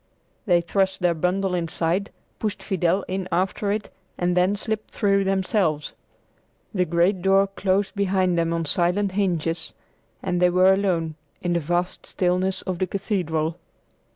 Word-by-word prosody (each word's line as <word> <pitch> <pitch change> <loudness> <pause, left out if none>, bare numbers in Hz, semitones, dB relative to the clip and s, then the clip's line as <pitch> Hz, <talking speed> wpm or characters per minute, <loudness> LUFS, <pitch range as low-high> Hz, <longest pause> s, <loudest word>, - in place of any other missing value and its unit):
They 175 -2 +4
thrust 190 +2 0
their 175 -1 +3
bundle 180 +3 0
inside, 175 +3 -1 0.3
pushed 210 -2 -3
Fidel 185 -1 +1
in 190 0 -3
after 190 +3 0
it, 210 +1 -3 0.3
and 175 0 +1
then 180 +3 +3
slipped 215 +1 -3
through 200 -1 +1
themselves. 190 -5 0 0.8
The 185 -3 +2
great 175 +3 +2
door 195 +1 +4
closed 195 0 0
behind 190 -3 +1
them 165 -1 +1
on 165 -1 -1
silent 180 +6 +1
hinges 175 -4 -1 0.5
and 180 -2 -1
they 180 - +6
were 185 +2 +5
alone 170 -5 0 0.3
in 175 -1 +1
the 170 - +2
vast 175 +3 -2
stillness 185 +1 0
of 185 -2 -3
the 185 - +1
cathedral. 170 -5 -1
185 Hz, 150 wpm, -24 LUFS, 175-195 Hz, 0.8 s, they